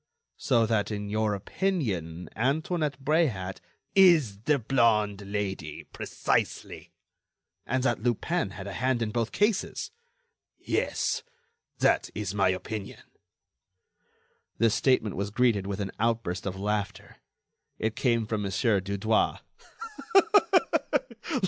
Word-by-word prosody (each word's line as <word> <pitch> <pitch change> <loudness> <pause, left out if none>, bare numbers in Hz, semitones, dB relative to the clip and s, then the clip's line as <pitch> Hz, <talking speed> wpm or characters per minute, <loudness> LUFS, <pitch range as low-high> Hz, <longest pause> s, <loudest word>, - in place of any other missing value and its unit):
"So 120 -4 +2
that, 110 -2 0
in 105 -1 -4
your 110 0 0
opinion, 95 - -2
Antoinette 145 - 0
Bréhat—" 125 - +1 0.4
"Is 160 - +5
the 150 -1 +4
blonde 110 -5 +2
Lady—precisely." 95 -6 -3 0.8
"And 130 +1 0
that 120 -4 +1
Lupin 120 - 0
had 95 0 -8
a 100 - -6
hand 130 0 0
in 110 - -3
both 115 0 -1
cases?" 205 -1 0 0.7
"Yes, - - -1 0.6
that - - +2
is 105 -3 -3
my 95 -2 +3
opinion." 95 +2 -4 1.5
This 115 -2 +3
statement 120 -7 +2
was 100 +1 -2
greeted 110 -3 +2
with 100 0 -3
an 100 -1 -3
outburst 110 -5 -1
of 95 0 -4
laughter. 105 0 -3 0.6
It 110 0 -2
came 115 -3 +1
from 110 -1 -2
Mon. 100 - -2 0.3
Dudouis. 100 +3 +1
110 Hz, 110 wpm, -28 LUFS, 100-125 Hz, 1.5 s, Is